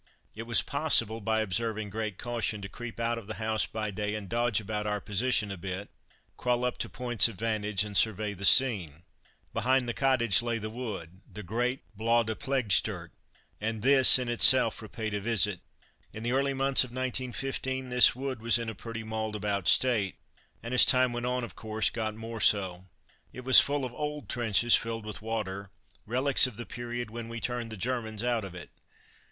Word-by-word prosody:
It 115 +2 -8
was 115 - +2
possible, 115 -7 +1
by 110 +1 0
observing 110 0 -2
great 110 -2 -4
caution, 115 -3 -3
to - - -5
creep 120 +3 -9
out 115 0 -1
of 105 - -14
the 110 - -5
house 110 -1 -1
by 110 -1 -4
day 105 +1 -3
and 105 -2 -6
dodge 120 0 0
about 105 0 -4
our 105 0 -1
position 105 +1 0
a 100 - -6
bit, 95 +3 -6 0.5
crawl 125 0 0
up 125 - -3
to - - -4
points 120 -2 +2
of 115 - -9
vantage 105 -1 -1
and 105 -1 -8
survey 105 +1 +2
the 100 0 -10
scene. 95 - +3 0.5
Behind 125 +2 +1
the 120 - -2
cottage 120 -8 +2
lay 120 -1 -2
the 110 -1 -6
wood 100 -7 -7
the 105 - -9
great 120 +7 -2
Bois 115 +2 +2
de 110 0 -3
Ploegstert 130 -4 -1 0.5
and 110 0 -3
this 135 -1 +8
in 125 -1 -4
itself 120 -1 +5
repaid 110 0 -6
a 105 - -1
visit. 105 -3 +1 0.5
In 110 - -8
the 120 - -1
early 135 +1 0
months 135 0 +3
of 130 - -8
1915 130 +1 -3
this 125 -1 +5
wood 130 -2 -5
was 115 -1 +3
in 115 -1 -4
a - - -5
pretty 115 +2 -8
mauled 110 -1 -4
about 100 -2 -2
state, 115 -7 +3 0.5
and 115 +2 -5
as 125 - +7
time 130 -1 +3
went 120 +1 -3
on 125 0 -1
of 120 - -8
course 110 -1 -2
got 110 -2 -4
more 115 +1 -7
so. 95 -3 +3 0.5
It 125 - -10
was 130 - +9
full 145 -1 -2
of 125 - -7
old 150 -6 -5
trenches, 120 0 +4
filled 115 -1 -3
with 105 -1 -6
water, 100 -3 -5 0.4
relies 130 +4 +3
of 120 -5 -10
the 120 - -5
period 120 -1 -6
when 115 0 -7
we 115 0 -6
turned 120 -1 -4
the 110 - -7
Germans 110 -1 -3
out 120 -3 0
of 95 -2 -9
it. 90 - -10
115 Hz, 195 wpm, -28 LUFS, 105-125 Hz, 0.5 s, was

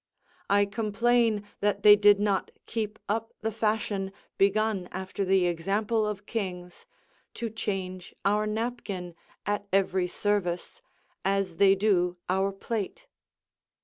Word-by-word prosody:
I 205 0 +4
complain 220 +1 +1
that 205 -1 0
they 210 -1 +10
did 205 -1 +6
not 205 -2 +1 0.2
keep 215 -2 -3
up 225 +2 -2
the 220 +1 -1
fashion, 210 -3 -1 0.3
begun 200 -1 +2
after 190 +1 -3
the 190 -1 +3
example 205 +6 0
of 205 -1 -4
kings, 180 -6 -5 0.5
to 230 -2 -3
change 185 -4 -4
our 210 +2 +2
napkin 210 -5 -3 0.3
at 205 0 -1
every 190 -1 +2
service, 205 - -1 0.4
as 195 -3 0
they 195 +1 +6
do 180 -3 +2
our 190 +1 +2
plate. 225 - -4
200 Hz, 120 wpm, -28 LUFS, 190-215 Hz, 0.5 s, they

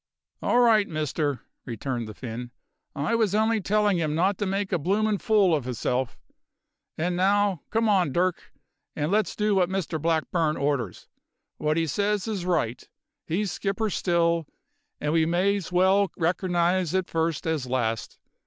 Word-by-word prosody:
"All - - +2
right, 220 -4 +5
Mister," 150 -4 -2 0.2
returned 120 0 -4
the 110 - -9
Finn, 120 0 -6 0.5
"I 145 +9 -1
was 220 -4 +2
only 220 0 +2
tellin' 205 0 +2
him 155 -2 -1
not 185 +4 +1
to 205 - -1
make 195 +1 -2
a 180 - +1
bloomin' 205 +5 +1
fool 205 -6 +3
of 145 -6 0
hisself. 125 0 -2 0.8
And 175 +3 -1
now, 195 -1 +2
come 225 +1 +1
on, 185 -8 +3
Dirk, 180 +4 -1 0.4
and 150 +2 -1
let's 215 +1 +1
do 210 0 +1
what 185 -2 +2
Mr 180 -5 -2
Blackburn 160 0 0
orders. 140 -9 -2 0.5
What 155 +1 0
'e 165 - +2
says 205 - 0
is 195 -5 -3
right; 125 -9 0 0.4
he's 190 +4 -1
skipper 200 +4 -2
still, 170 -3 +1 0.5
and 150 +1 -1
we 160 -1 +3
may's 185 +2 0
well 190 +3 +4
recernise 175 0 +1
it 185 -1 0
first 165 -1 -1
as 155 -5 -1
last. 115 -3 -2
175 Hz, 155 wpm, -26 LUFS, 150-200 Hz, 0.8 s, right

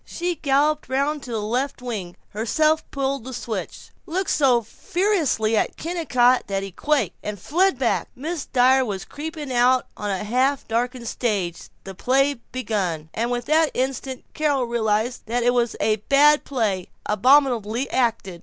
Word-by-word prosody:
She 350 +1 -3
galloped 295 -1 +1
round 280 +3 0
to 250 - -9
the 225 - -1
left 245 +8 -2
wing, 215 -8 -5
herself 305 +9 +1
pulled 275 -2 -2
the 260 +1 -7
switch, 220 -5 -6 0.2
looked 365 +3 -1
so 255 -5 +3
ferociously 310 - 0
at - - 0
Kennicott 255 -8 +2
that 195 -1 -2
he 195 - -6
quaked, 275 - 0
and 210 0 -5
fled 355 - +2
back. 245 -3 0
Mrs. 310 +3 -4
Dyer 260 +1 +5
was 200 -6 -4
creeping 300 -2 -6
out 250 +1 +3
on 210 - -4
the 195 0 -2
half 255 +6 +1
darkened 240 +1 -2
stage. 200 -8 -2
The 195 - -8
play 270 +8 +2
was 235 - -18
begun. 190 -11 -2
And 235 +2 -1
with 245 -1 -2
that 315 0 +3
instant 260 0 -3
Carol 290 -4 +1
realized 230 0 -1
that 240 +2 0
it 245 +1 +3
was 240 -2 +1
a 215 -1 +2
bad 285 +7 +4
play 210 -9 -1 0.2
abominably 245 +1 +3
acted. 225 -8 0
250 Hz, 165 wpm, -23 LUFS, 220-285 Hz, 0.2 s, Dyer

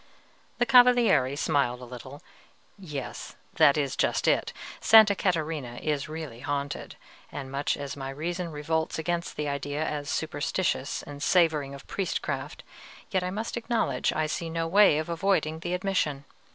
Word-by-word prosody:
The 245 - +2
Cavaliere 245 - +5
smiled 140 -6 +1
a 125 - -9
little: 130 +3 -10 0.6
"Yes, 150 -8 -7 0.2
that 140 - +6
is 140 -3 -1
just - - +1
it. - - +2 0.3
Sta. 220 -1 +8
Catarina 160 -9 -2
is 145 +2 -2
really 155 -7 -7
haunted; 140 +1 -4 0.4
and 135 -2 -6
much 140 +1 -1
as 140 -1 -5
my 135 -1 -5
reason 170 +5 -4
revolts 160 +2 -2
against 170 +1 -2
the 150 - -3
idea 145 +2 -2
as 145 -1 -3
superstitious 155 -2 -1
and 145 0 -9
savoring 155 -5 +2
of 140 - -12
priestcraft, 195 -2 -3 0.5
yet 185 - +1
I 180 - -2
must 215 +5 -4
acknowledge 235 0 0
I 155 - 0
see 165 +2 -3
no 165 0 -2
way 195 -3 +5
of 155 - -2
avoiding 165 -2 0
the 175 +2 -2
admission. 175 -7 -1
155 Hz, 150 wpm, -27 LUFS, 140-175 Hz, 0.6 s, Sta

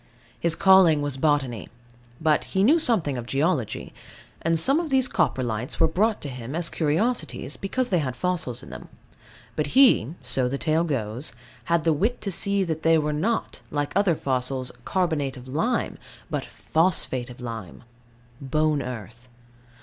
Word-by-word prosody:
His 170 -1 +2
calling 180 -6 +5
was 145 -2 -2
botany: 135 -6 0 0.5
but 155 -1 +2
he 190 - 0
knew 300 +10 +5
something 170 - +1
of 120 - -8
geology. 140 - -1 0.5
And 165 0 +1
some 275 - +3
of 335 -2 -3
these 265 -2 +3
Coprolites 120 - -1
were 165 - +5
brought 210 +7 0
him 130 -1 -6
as 170 0 0
curiosities, 155 - 0
because 250 +6 -1
they 180 - +3
had 130 -5 -2
fossils 180 +5 0
in - - -11
them. - - -9 0.7
But - - -1
he 205 - +5
(so 130 -2 +1
the 135 +2 -2
tale 160 +3 +1
goes) 125 -3 -3 0.3
had 170 -1 +1
the 165 - +3
wit 215 +11 0
to 200 - -3
see 200 +2 +1
that 160 -3 -3
they 165 0 +4
were 150 -1 0
not, 220 +10 -1
like 145 -1 -2
other 195 -4 +3
fossils, 130 -2 -2
carbonate 160 -8 -1
of 125 0 -11
lime, 215 - -1 0.3
but - - -2
phosphate 160 -7 0
of 125 - -11
lime 115 -6 -7 0.6
bone 150 +2 +1
earth. 120 -1 -8
155 Hz, 160 wpm, -25 LUFS, 130-185 Hz, 0.7 s, calling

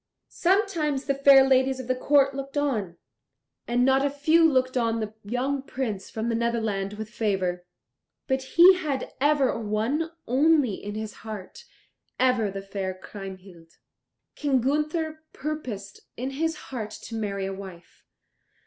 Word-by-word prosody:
Sometimes 340 -7 +1
the 275 - +1
fair 275 -1 +7
ladies 260 0 +3
of 260 - -5
the 255 - +2
court 275 +1 +3
looked 275 +1 -5
on, 215 -12 -1 0.7
and 245 +1 +2
not 270 +1 +4
a 285 - +2
few 310 +4 +3
looked 255 -1 +1
on 230 -2 +1
the 215 -1 -4
young 255 +6 -1
Prince 235 -8 -4
from 220 +1 -3
the 235 - 0
Netherland 220 -4 -1
with 215 0 -6
favour. 185 -6 -1 0.6
But 265 -1 0 0.2
he 355 +3 +10
had 285 -7 -3
ever 285 -4 +3
one 225 +9 -1 0.2
only 280 -2 +3
in 205 +2 -6
his 215 -1 -5
heart, 220 - -8 0.5
ever 250 -4 +3
the 195 0 -6
fair 195 -1 -4
Kriemhild. 185 -4 -11 0.6
King 280 -3 +1
Gunther 305 +4 -1
purposed 255 -10 -5 0.2
in 260 +3 -3
his 320 +4 -1
heart 235 -8 -6
to 220 - -10
marry 200 -3 -2
a 195 - -3
wife. 190 -3 -11
255 Hz, 150 wpm, -26 LUFS, 210-280 Hz, 0.7 s, he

